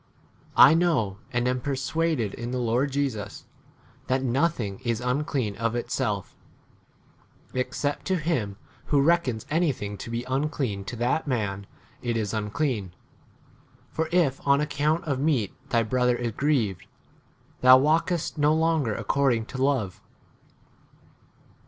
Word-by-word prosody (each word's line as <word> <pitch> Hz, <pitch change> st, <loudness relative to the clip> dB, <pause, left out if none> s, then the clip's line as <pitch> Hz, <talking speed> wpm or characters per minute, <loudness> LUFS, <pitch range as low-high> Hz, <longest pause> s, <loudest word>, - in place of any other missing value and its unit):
I -, -, +9 dB
know, 155 Hz, -, +1 dB
and 120 Hz, -1 st, 0 dB
am 125 Hz, 0 st, 0 dB
persuaded 140 Hz, -3 st, -1 dB
in 120 Hz, +1 st, -5 dB
the 125 Hz, -, -2 dB
Lord 125 Hz, +3 st, +1 dB
Jesus, 130 Hz, -8 st, -3 dB, 0.6 s
that 130 Hz, +1 st, +1 dB
nothing 125 Hz, -6 st, 0 dB
is 115 Hz, -3 st, -1 dB
unclean 125 Hz, -3 st, -1 dB
of 115 Hz, +2 st, -1 dB
itself; 110 Hz, -5 st, -2 dB, 1.2 s
ex 125 Hz, 0 st, -2 dB
cept 145 Hz, 0 st, -1 dB
to 190 Hz, -, +1 dB
him 135 Hz, -, -1 dB, 0.3 s
who 145 Hz, -, +2 dB
reckons 140 Hz, -7 st, +2 dB
anything 135 Hz, -, -1 dB
to -, -, -7 dB
be 115 Hz, +1 st, -3 dB
unclean, 130 Hz, -6 st, -2 dB
to 120 Hz, -, -5 dB
that 120 Hz, +7 st, 0 dB
man 100 Hz, -6 st, -2 dB, 0.3 s
[it 120 Hz, -2 st, -1 dB
is] 105 Hz, -3 st, -1 dB
15 110 Hz, -1 st, -2 dB
unclean. 110 Hz, -, -2 dB, 1.0 s
For 160 Hz, 0 st, -1 dB
n 175 Hz, -1 st, +5 dB
if 135 Hz, -1 st, -4 dB
on 140 Hz, 0 st, +5 dB
account 150 Hz, +2 st, 0 dB
of 140 Hz, -5 st, -2 dB
meat 135 Hz, -9 st, +1 dB, 0.2 s
thy 115 Hz, -1 st, +2 dB
brother 125 Hz, +2 st, +1 dB
is 120 Hz, -1 st, -2 dB
grieved, 110 Hz, -, 0 dB, 0.7 s
thou 130 Hz, 0 st, +9 dB
walkest 160 Hz, +3 st, +1 dB
no 150 Hz, +1 st, +4 dB
longer 160 Hz, -8 st, +1 dB
according 130 Hz, -5 st, +1 dB
to 130 Hz, +2 st, -6 dB
love. 125 Hz, -10 st, 0 dB
130 Hz, 140 wpm, -26 LUFS, 115-150 Hz, 1.2 s, I